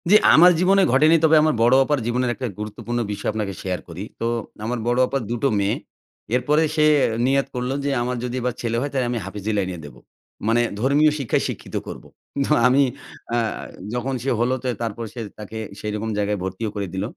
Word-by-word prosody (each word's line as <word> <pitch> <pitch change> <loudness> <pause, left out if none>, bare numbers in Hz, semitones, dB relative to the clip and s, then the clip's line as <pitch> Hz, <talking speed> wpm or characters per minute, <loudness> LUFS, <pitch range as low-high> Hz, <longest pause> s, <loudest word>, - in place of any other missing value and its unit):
জি, 205 - +7 0.2
আমার 175 +3 +8
জীবনে 195 +2 +4
ঘটেনি। 155 +5 +5
তবে 160 0 +6
আমার 155 - +3
বড় 120 +2 +5
আপার 145 0 +1
জীবনের 125 +1 0
একটা 130 - -4
গুরুত্বপূর্ণ 110 +3 -4
বিষয় 105 0 -3
আপনাকে 105 -2 -3
শেয়ার 90 -1 -2
করি। 85 +3 -6 0.2
তো - - -2 0.4
আমার 120 +1 -2
বড় 120 +1 +2
আপার 135 +1 -2
দুটো 120 +3 0
মেয়ে। 100 +1 +1 0.6
এরপরে 150 +6 +2
সে 155 -1 +4 0.4
নিয়াত 135 +1 +2
করল 125 +1 -2
যে, - - +1
"আমার 125 +1 -2
যদি 125 0 -3
এবার 125 0 -1
ছেলে 115 -1 -1
হয়, 145 - -2
তাইলে 130 -3 0
আমি 120 - -1
হাফিজ 100 0 -8
লাইনে 95 -3 -2
দেব।" 70 - -11 0.5
মানে 115 +1 +3 0.2
ধর্মীয় 145 +5 +4
শিক্ষায় 130 -5 0
শিক্ষিত - - -7
করব। - - -8 0.4
তো - - -4 0.2
আমি 135 +3 +4 0.5
অ্যা 120 0 +1 0.5
যখন 125 +2 -2
সে 135 - -1
হলো 120 +2 +2
তো - - -2 0.2
তারপরে 115 0 -4
সে 120 - -6 0.2
তাকে 105 +1 -7 0.2
সেই 105 - -4
রকম 110 +1 -3
জায়গায় 105 0 0
ভর্তিও 95 +4 -3
করে 100 -1 -2
দিল। 95 +1 -2
120 Hz, 200 wpm, -22 LUFS, 105-135 Hz, 0.6 s, আমার